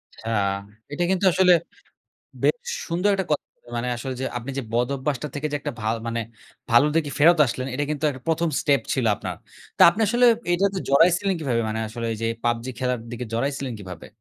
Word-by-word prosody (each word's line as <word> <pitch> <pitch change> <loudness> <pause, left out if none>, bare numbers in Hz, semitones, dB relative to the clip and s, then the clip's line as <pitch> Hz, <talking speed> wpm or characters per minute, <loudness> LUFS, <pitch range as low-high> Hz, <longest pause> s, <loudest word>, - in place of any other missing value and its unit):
আচ্ছা। 115 - -7 0.6
এটা 160 +4 -1
কিন্তু 190 +1 +1
আসলে 185 0 +5 0.9
বেশ - - +3 0.3
সুন্দর 180 +4 +1
একটা 190 -2 -2
কথা 150 - 0
বললেন। 120 - -20
মানে 125 +1 -2
আসলে 130 +2 -5
যে - - -1
আপনি 120 +4 -7
যে - - -1
বদভ্যাসটা 135 +4 -1
থেকে 145 +1 -2
যে 145 - +1
একটা - - -4
ভা 110 - -4 0.2
মানে 115 0 -2 0.5
ভালোর 120 +6 +5
দিকে 150 -3 +1
ফেরত 165 +3 +6
আসলেন, 130 +2 -3
এটা 145 - -1
কিন্তু 150 0 -2
একটা 130 -2 -9
১ম 165 +1 +1
স্টেপ 140 -2 +3
ছিল 130 - 0
আপনার। - - -5 0.4
তা - - +5
আপনি 205 - -5
আসলে 240 +3 +4 0.2
এইটাতে 190 +2 +1
জড়াইছিলেন 175 +7 +4
কিভাবে? 125 -6 0
মানে 110 +1 -2
আসলে 115 +1 -5
এইযে 115 +1 -3 0.2
"PUBG" 120 0 0
খেলার 125 -1 0
দিকে 120 +1 -4
জড়াইছিলেন 135 +2 -2
কিভাবে? 90 -4 -9
140 Hz, 190 wpm, -24 LUFS, 120-170 Hz, 0.9 s, ফেরত